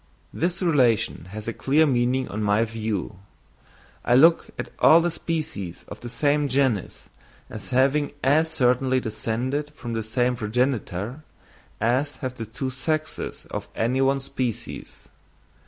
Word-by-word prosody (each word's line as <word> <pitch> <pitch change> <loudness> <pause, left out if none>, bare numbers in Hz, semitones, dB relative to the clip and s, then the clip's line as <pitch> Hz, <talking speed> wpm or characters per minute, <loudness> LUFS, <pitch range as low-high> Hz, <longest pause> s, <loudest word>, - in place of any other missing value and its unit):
This 175 +3 -1
relation 125 - +2
has 105 +4 -8
a 115 - -2
clear 150 +7 +3
meaning 130 -1 +1
on 110 - -4
my 105 +2 +2
view: 110 -5 -4 0.9
I 120 - +3
look 165 +6 +6
at - - -5
all 165 - +7
the 170 +1 0
species 155 - -4
of 105 - -9
the 120 - -7
same 145 +5 +1
genus 130 -7 0 0.4
as 110 -2 -8
having 135 +3 +2
as 155 +5 +3
certainly 130 -2 +2
descended 125 +6 -2
from 120 -3 -6
the 115 - -1
same 120 +3 0
progenitor, 120 - -2 0.6
as 130 +6 +1
have 130 -1 -4
the 115 -3 -7
two 130 +4 -4
sexes 155 +4 -3
of - - -4
any 125 +4 +1
one 135 +1 +3
species. 130 -4 -5
130 Hz, 140 wpm, -24 LUFS, 115-145 Hz, 0.9 s, all